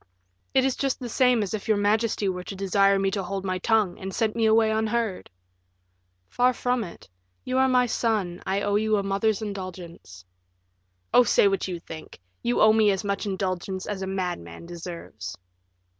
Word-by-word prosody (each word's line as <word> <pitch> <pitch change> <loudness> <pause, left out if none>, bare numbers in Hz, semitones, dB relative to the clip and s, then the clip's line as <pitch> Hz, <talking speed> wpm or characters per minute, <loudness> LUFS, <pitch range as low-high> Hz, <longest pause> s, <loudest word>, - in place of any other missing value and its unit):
"It 265 - +5
is 270 - +1
just 275 -2 -1
the 250 - -5
same 250 -2 +3
as 200 - -4
if 215 +1 -4
your 215 -2 +3
majesty 210 0 +1
were 180 -1 -2
to 195 - -6
desire 195 +1 +3
me 195 0 +1
to 195 - -1
hold 195 +1 -4
my 185 -1 -1
tongue, 215 -2 +1
and 190 0 -5
sent 220 -2 0
me 225 -1 +2
away 220 0 +4
unheard." 220 -2 -1 1.0
"Far 250 +1 +2
from 245 0 0
it; 175 - -11 0.4
you 255 +1 0
are 265 - +4
my 250 -1 +4
son, 215 -7 -1
I 195 +1 -1
owe 205 0 +1
you 215 0 +2
a 200 - -1
mother's 200 +2 0
indulgence." 180 - -8 0.9
"Oh, 245 - +8
say 205 - +4
what 195 0 0
you 180 -2 -4
think; 160 - -10 0.2
you 120 +4 0
owe 215 0 +7
me 220 -1 +4
as 195 0 0
much 200 +1 -2
indulgence 190 -1 -3
as 205 -2 -4
a 190 - -3
madman 175 - -4
deserves." 170 - -8
200 Hz, 190 wpm, -25 LUFS, 185-220 Hz, 1.0 s, Oh